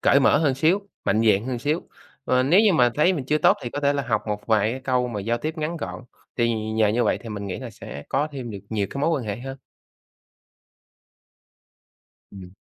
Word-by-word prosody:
cởi 140 Hz, -, +4 dB
mở 135 Hz, -, +4 dB
hơn 145 Hz, -4 st, +2 dB
xíu, 180 Hz, +9 st, +1 dB, 0.2 s
mạnh 110 Hz, +3 st, +2 dB
dạn 105 Hz, 0 st, +3 dB
hơn 130 Hz, -2 st, -2 dB
xíu. 150 Hz, +7 st, -1 dB, 0.4 s
Ờ, 130 Hz, 0 st, +2 dB
nếu 165 Hz, +10 st, +5 dB
như 215 Hz, -3 st, +4 dB
mà 125 Hz, -7 st, +4 dB
thấy 165 Hz, +5 st, +3 dB
mình 150 Hz, -8 st, -3 dB
chưa 150 Hz, +4 st, +1 dB
tốt -, -, +4 dB
thì 120 Hz, -, -4 dB
có 145 Hz, -, -4 dB
thể 140 Hz, 0 st, +3 dB
là 140 Hz, -1 st, -1 dB
học 120 Hz, -3 st, -1 dB
một 105 Hz, -1 st, -4 dB
vài 110 Hz, -1 st, +3 dB
cái 130 Hz, -, -6 dB
câu 125 Hz, -2 st, 0 dB
mà 105 Hz, -4 st, -4 dB
giao 115 Hz, +4 st, -1 dB
tiếp 155 Hz, +6 st, -4 dB
ngắn 155 Hz, +2 st, -2 dB
gọn, 145 Hz, -, -6 dB, 0.3 s
thì 115 Hz, -1 st, +2 dB, 0.2 s
nhờ 110 Hz, -1 st, +3 dB
như 115 Hz, +3 st, +1 dB
vậy -, -, +1 dB
thì 115 Hz, -, -8 dB
mình 105 Hz, -2 st, -5 dB
nghĩ 95 Hz, -, -4 dB
là 125 Hz, -3 st, -7 dB
sẽ 70 Hz, -8 st, -9 dB
có 145 Hz, +3 st, 0 dB
thêm 130 Hz, -4 st, -6 dB
được 100 Hz, -, -6 dB
nhiều 105 Hz, -3 st, 0 dB
cái 140 Hz, -, -5 dB
mối 150 Hz, -, +2 dB
quan 145 Hz, -7 st, -1 dB
hệ 105 Hz, -2 st, -3 dB
hơn. 135 Hz, +3 st, -7 dB, 2.7 s
Ừm. 95 Hz, -2 st, -11 dB
125 Hz, 230 wpm, -24 LUFS, 110-145 Hz, 2.7 s, nếu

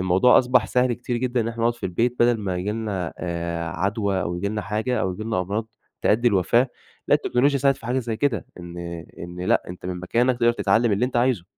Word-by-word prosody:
الموضوع 95 Hz, +7 st, +5 dB
أصبح 125 Hz, -2 st, +3 dB
سهل 125 Hz, 0 st, +2 dB
كتير 120 Hz, +1 st, -3 dB
جدًا 125 Hz, 0 st, 0 dB
إن 115 Hz, -, -1 dB
إحنا 115 Hz, 0 st, -6 dB
نقعد 120 Hz, 0 st, +2 dB
في -, -, -4 dB
البيت 115 Hz, +7 st, 0 dB
بدل 120 Hz, -1 st, +4 dB
ما 95 Hz, -3 st, -2 dB
ييجي 95 Hz, +4 st, -2 dB
لنا 100 Hz, -6 st, -3 dB
آآ 85 Hz, -1 st, -3 dB
عدوى 100 Hz, +2 st, -1 dB
أو 85 Hz, 0 st, -3 dB
ييجي 100 Hz, +3 st, -2 dB
لنا 105 Hz, 0 st, -3 dB
حاجة 110 Hz, +3 st, -1 dB
أو 95 Hz, -4 st, 0 dB
ييجي 100 Hz, +4 st, -6 dB
لنا 110 Hz, -5 st, 0 dB
أمراض 105 Hz, +5 st, -2 dB, 0.4 s
تؤدي 120 Hz, +3 st, +3 dB
الوفاة، 115 Hz, +6 st, +3 dB, 0.4 s
لا -, -, +6 dB
التكنولوجيا 140 Hz, +3 st, +2 dB
ساعدت 135 Hz, 0 st, +3 dB
في 115 Hz, -, -10 dB
حاجة 125 Hz, +2 st, 0 dB
زي 115 Hz, -3 st, -3 dB
كده. 125 Hz, -3 st, 0 dB
إن 85 Hz, 0 st, -9 dB, 0.4 s
إن 90 Hz, +1 st, -8 dB
لأ 90 Hz, -, +2 dB
أنتَ 90 Hz, 0 st, -8 dB
من 90 Hz, -1 st, -4 dB
مكانك 120 Hz, +7 st, +1 dB
تقدر 120 Hz, 0 st, +4 dB
تتعلم 115 Hz, -1 st, +2 dB
اللي 100 Hz, +5 st, +2 dB
أنتَ 125 Hz, -, -2 dB
عايزه، 120 Hz, -7 st, +2 dB
110 Hz, 230 wpm, -23 LUFS, 90-120 Hz, 0.4 s, لا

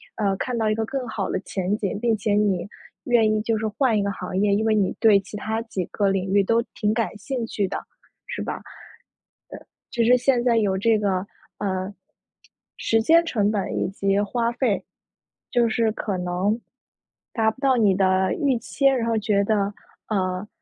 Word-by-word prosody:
呃， 200 Hz, -3 st, 0 dB
看 250 Hz, -2 st, -3 dB
到 220 Hz, -1 st, +1 dB
一 215 Hz, -, +1 dB
个 225 Hz, 0 st, -1 dB
更 260 Hz, +1 st, -4 dB
好 220 Hz, -4 st, -3 dB
的 -, -, -1 dB
前 190 Hz, 0 st, -2 dB
景， 200 Hz, -1 st, -3 dB
并 230 Hz, 0 st, +2 dB
且 210 Hz, 0 st, -1 dB
你 205 Hz, -4 st, +1 dB, 0.4 s
愿 230 Hz, -3 st, +4 dB
意 215 Hz, -, 0 dB
就 225 Hz, +1 st, 0 dB
是 220 Hz, +1 st, -1 dB
换 225 Hz, +1 st, +1 dB
一 -, -, +2 dB
个 200 Hz, -, -1 dB
行 185 Hz, -1 st, -5 dB
业， 205 Hz, 0 st, +3 dB
因 210 Hz, +2 st, +1 dB
为 220 Hz, -, +3 dB
你 200 Hz, -3 st, +1 dB
对 215 Hz, -3 st, +6 dB
其 195 Hz, +2 st, -10 dB
它 220 Hz, +2 st, -2 dB
几 195 Hz, -6 st, -4 dB
个 200 Hz, +2 st, 0 dB
领 195 Hz, 0 st, -1 dB
域 200 Hz, -1 st, +5 dB
都 230 Hz, +4 st, +2 dB
挺 210 Hz, 0 st, +1 dB
感 225 Hz, -2 st, -2 dB
兴 240 Hz, +3 st, -3 dB
趣 205 Hz, -3 st, -1 dB
的， -, -, -3 dB, 0.5 s
是 -, -, -4 dB
吧？ -, -, -3 dB
呃， -, -, -12 dB, 1.3 s
就 235 Hz, -, +1 dB
是 245 Hz, +2 st, +5 dB
现 250 Hz, -1 st, +2 dB
在 235 Hz, -2 st, +3 dB
有 200 Hz, -4 st, +1 dB
这 220 Hz, +2 st, +3 dB
个， 195 Hz, -2 st, 0 dB, 0.3 s
呃， 190 Hz, -1 st, -2 dB, 0.9 s
时 225 Hz, 0 st, +2 dB
间 330 Hz, +8 st, +5 dB
成 210 Hz, -10 st, +1 dB
本 200 Hz, -3 st, -2 dB
以 -, -, 0 dB
及 195 Hz, 0 st, 0 dB
花 230 Hz, +3 st, 0 dB
费， 235 Hz, -4 st, 0 dB, 0.7 s
就 240 Hz, -1 st, +3 dB
是 225 Hz, 0 st, +1 dB
可 200 Hz, -4 st, -3 dB
能 180 Hz, +5 st, -1 dB, 0.7 s
达 220 Hz, -2 st, +2 dB
不 240 Hz, -, -19 dB
到 265 Hz, -2 st, +3 dB
你 205 Hz, -5 st, +4 dB
的 190 Hz, 0 st, +2 dB
预 275 Hz, -4 st, +1 dB
期， 275 Hz, -, -3 dB
然 260 Hz, -4 st, +4 dB
后 230 Hz, -1 st, +1 dB
觉 205 Hz, -2 st, +1 dB
得， 205 Hz, -1 st, 0 dB, 0.3 s
呃， 185 Hz, -1 st, -1 dB
215 Hz, 210 characters per minute, -23 LUFS, 195-230 Hz, 1.3 s, 对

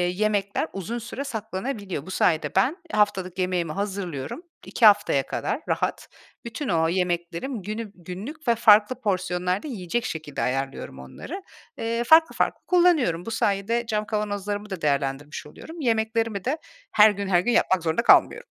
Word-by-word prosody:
yemekler 205 Hz, -1 st, 0 dB
uzun 195 Hz, +5 st, -4 dB
süre 240 Hz, +4 st, -6 dB
saklanabiliyor. 205 Hz, -, -5 dB
Bu 190 Hz, -, -8 dB
sayede 165 Hz, -4 st, +1 dB
ben 290 Hz, +8 st, +2 dB
haftalık 190 Hz, -3 st, 0 dB
yemeğimi 180 Hz, -3 st, 0 dB
hazırlıyorum 190 Hz, -, -4 dB, 0.2 s
2 230 Hz, -, +2 dB
haftaya 205 Hz, -10 st, +5 dB
kadar -, -, -2 dB
rahat. -, -, -1 dB, 0.4 s
Bütün 235 Hz, +4 st, -5 dB
o 165 Hz, -1 st, +2 dB
yemeklerim 180 Hz, +6 st, -2 dB
günü 215 Hz, +2 st, -5 dB
günlük 205 Hz, -, -8 dB
ve 235 Hz, -, +4 dB
farklı 220 Hz, +3 st, +5 dB
porsiyonlarda 185 Hz, +2 st, -1 dB
yiyecek 230 Hz, 0 st, -3 dB
şekilde 155 Hz, -7 st, -5 dB
ayarlıyorum 135 Hz, -, -3 dB
onları. 330 Hz, -, -8 dB, 0.3 s
Eee, 230 Hz, +1 st, -1 dB
farklı 320 Hz, +6 st, +5 dB
farklı -, -, 0 dB
kullanıyorum. 320 Hz, -, +3 dB
Bu 225 Hz, -, -5 dB
sayede 225 Hz, +2 st, 0 dB
cam 215 Hz, -2 st, -1 dB
kavanozlarımı 205 Hz, -1 st, -3 dB
da 190 Hz, -4 st, -6 dB
değerlendirmiş 140 Hz, +1 st, -1 dB
oluyorum. 320 Hz, -, -10 dB
Yemeklerimi 225 Hz, -3 st, 0 dB
de 285 Hz, +5 st, 0 dB, 0.3 s
her 215 Hz, 0 st, +7 dB
gün 200 Hz, -1 st, -4 dB
her 180 Hz, -2 st, +4 dB
gün 240 Hz, +7 st, 0 dB
yapmak 185 Hz, -6 st, +2 dB
zorunda 165 Hz, +8 st, +1 dB
kalmıyorum. -, -, +5 dB
205 Hz, 150 wpm, -25 LUFS, 180-230 Hz, 0.4 s, her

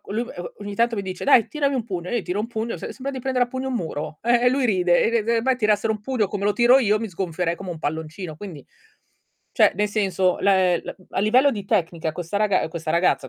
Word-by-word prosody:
lui 235 Hz, +3 st, -1 dB
e 175 Hz, -, -7 dB
o -, -, -7 dB
ogni 205 Hz, 0 st, -6 dB
tanto 235 Hz, +1 st, +1 dB
mi 200 Hz, -, -2 dB
dice: 185 Hz, -1 st, -6 dB
"Dai 260 Hz, -5 st, +5 dB
tirami 280 Hz, -2 st, 0 dB
un 240 Hz, -4 st, -1 dB
pugno", 180 Hz, -5 st, -5 dB
e -, -, -5 dB
io 240 Hz, -, +1 dB
gl 195 Hz, -, -6 dB
tiro 190 Hz, +4 st, -2 dB
un 220 Hz, -, -2 dB
pugno 230 Hz, 0 st, -4 dB
se -, -, -6 dB
sembra 275 Hz, +1 st, -5 dB
di 260 Hz, -, -5 dB
prendere 250 Hz, -1 st, +1 dB
a -, -, -22 dB
pugno 260 Hz, +1 st, -4 dB
un 260 Hz, -, -3 dB
muro 155 Hz, -5 st, -4 dB
eh, 240 Hz, +1 st, +3 dB
e -, -, +7 dB
lui 260 Hz, -1 st, +1 dB
ride, 180 Hz, -4 st, +3 dB
e -, -, +2 dB
de 230 Hz, -1 st, +1 dB
de 230 Hz, +1 st, +1 dB
me 260 Hz, 0 st, +2 dB
tirassero 215 Hz, -1 st, +1 dB
un 215 Hz, -, -6 dB
pugno 220 Hz, -2 st, 0 dB
come 200 Hz, -1 st, -4 dB
lo 205 Hz, -, +3 dB
tiro 245 Hz, +3 st, +5 dB
io 215 Hz, -4 st, +2 dB
mi 225 Hz, -, -4 dB
sgonfierei 175 Hz, -2 st, -2 dB
come 190 Hz, -2 st, -7 dB
un 165 Hz, -, -6 dB
palloncino. 160 Hz, +2 st, -5 dB
Quindi, 170 Hz, -7 st, -9 dB, 0.9 s
cioè -, -, +4 dB
nel 210 Hz, 0 st, +1 dB
senso 190 Hz, -3 st, +1 dB
la 200 Hz, 0 st, +4 dB
è 180 Hz, -2 st, +2 dB, 0.3 s
a -, -, -1 dB
livello 250 Hz, +7 st, +4 dB
di 205 Hz, -6 st, -5 dB
tecnica 165 Hz, -3 st, -1 dB
questa 175 Hz, +3 st, -4 dB
raga 205 Hz, -5 st, +2 dB
questa 160 Hz, -1 st, -5 dB
ragazza 170 Hz, -5 st, +1 dB
205 Hz, 265 wpm, -23 LUFS, 180-235 Hz, 0.9 s, e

